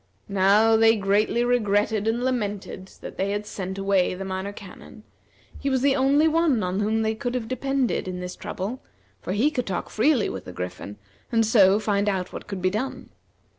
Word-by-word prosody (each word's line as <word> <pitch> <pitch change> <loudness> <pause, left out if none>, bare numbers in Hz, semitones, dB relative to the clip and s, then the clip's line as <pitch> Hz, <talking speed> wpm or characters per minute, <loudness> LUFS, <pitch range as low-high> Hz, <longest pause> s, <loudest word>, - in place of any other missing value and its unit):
Now 200 +3 +4
they 225 0 +5
greatly 210 +3 +1
regretted 215 -3 +1
and 235 +2 0
lamented 205 -6 -3
that - - -9
they 195 - 0
had 205 +1 -2
sent 190 -2 -5
away 195 -2 +1
the 195 +1 -6
Minor 190 +1 -4
Canon; 205 +1 -12 0.6
he 280 - -1
was 260 -1 0
the 275 -1 +4
only 280 +3 +3
one 315 - +2
on 180 +2 -1
whom 220 +2 +1
they 220 0 +1
could 245 +3 -4
have 235 -3 -3
depended 260 -3 -1
in 180 -1 -4
this 180 0 -6
trouble, 215 +8 -5 0.4
for 185 - -3
he 250 +9 +2
could 250 -5 -3
talk 185 -3 -3
freely 265 +4 +2
with 95 - -6
the 90 - -8
Griffin, 90 +3 -6 0.3
and 225 -1 +3
so 200 -3 +5
find 205 -1 0
out 190 -2 -3
what - - -8
could 195 -3 -6
be 185 - +2
done. 255 +7 -4
210 Hz, 195 wpm, -24 LUFS, 195-245 Hz, 0.6 s, they